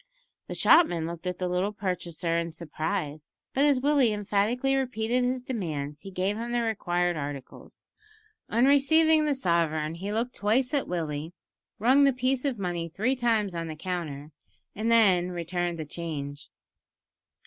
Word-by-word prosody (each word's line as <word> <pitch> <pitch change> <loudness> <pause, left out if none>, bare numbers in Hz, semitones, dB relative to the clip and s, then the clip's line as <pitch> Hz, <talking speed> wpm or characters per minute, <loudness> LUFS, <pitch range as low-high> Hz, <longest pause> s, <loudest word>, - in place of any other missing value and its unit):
The - - -5
shopman 175 - +4
looked 170 +2 -6
at 180 -1 -2
the 180 - -2
little 180 +3 0
purchaser 180 -4 -2
in 170 -1 -1
surprise, 155 -1 -4 0.2
but 275 +2 +3
as 285 -3 +4
Willie 275 -3 +3
emphatically 210 +6 0
repeated 250 -2 0
his 250 0 -1
demands 155 - -4
he 195 - -9
gave 190 +2 -1
him 235 +1 -4
the 240 - +2
required 175 -5 0
articles. 140 -2 -8 0.6
On 235 +3 +3
receiving 310 +3 +5
the 295 -2 +1
sovereign 165 -7 0
he 190 +5 -5
looked 235 +3 -1
twice 240 +6 +1
at 285 - 0
Willie, 160 -2 -3 0.4
rung 260 +6 +4
the 275 - +4
piece 255 +2 0
of 270 -4 0
money 175 -3 -3
three 220 +11 0
times 225 -6 +1
on 165 -1 -3
the 160 - -6
counter, 155 -4 -5 0.4
and 220 +3 -1
then 190 -6 +4
returned 175 0 -2
the 155 - -5
change. 145 -3 -6
190 Hz, 160 wpm, -27 LUFS, 170-245 Hz, 0.6 s, receiving